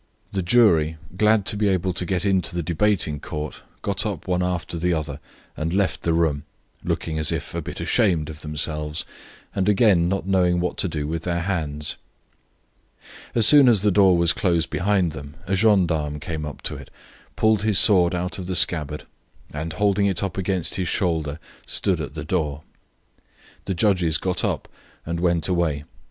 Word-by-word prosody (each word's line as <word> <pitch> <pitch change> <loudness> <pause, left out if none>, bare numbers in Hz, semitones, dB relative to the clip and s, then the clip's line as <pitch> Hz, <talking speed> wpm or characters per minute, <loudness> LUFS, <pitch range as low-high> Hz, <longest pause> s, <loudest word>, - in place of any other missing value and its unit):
The 95 - -1
jury, 85 -6 +3 0.2
glad 105 0 +3
to - - +1
be 105 0 +1
able 95 -1 0
to 90 - -2
get 95 0 -1
into 95 -3 +1
the 85 - -1
debating 85 -2 0
court, 75 +1 -6 0.2
got - - 0
up - - -4
one 90 -1 0
after 90 -2 -2
the 90 +1 +1
other 75 -3 -4 0.4
and 80 +1 -3
left 100 -1 0
the 85 - 0
room, 80 -3 +1 0.4
looking 80 -1 -2
as 75 - +2
if - - -4
a - - -2
bit - - -7
ashamed 90 -10 +1
of 80 -1 -9
themselves 75 +1 -4 0.5
and 95 0 0
again 95 -5 +4
not 95 0 -2
knowing 90 -2 +2
what 90 - -1
to - - 0
do 75 -4 -3
with 80 +1 -3
their 85 0 -2
hands. 75 -5 -2 1.4
As 115 -2 +4
soon 140 +1 +7
as 105 -5 +3
the 105 - +3
door 95 -2 +5
was 85 0 +3
closed 85 -3 0
behind 95 -3 +1
them 70 +1 -9
a 95 - -2
gendarme 85 -8 +2
came 80 -1 -5
up 75 - -9
to - - -3
it, - - -11 0.5
pulled 110 -2 +2
his 105 -2 +2
sword 90 -4 +5
out 90 +2 -3
of 90 - -6
the 95 - -2
scabbard, 75 -4 0 0.5
and, 80 +2 -4
holding 100 +1 +2
it 95 -1 -1
up 95 -3 -3
against 95 -2 -1
his 90 -2 -1
shoulder, 80 -6 -1 0.3
stood - - +1
at - - -7
the - - -5
door. 75 -5 -2 1.0
The 95 - -2
judges 90 -4 +2
got 90 +2 -1
up - - -1 0.4
and 85 +1 -3
went 85 -3 +1
away. 85 -5 0
90 Hz, 185 wpm, -23 LUFS, 80-95 Hz, 1.4 s, soon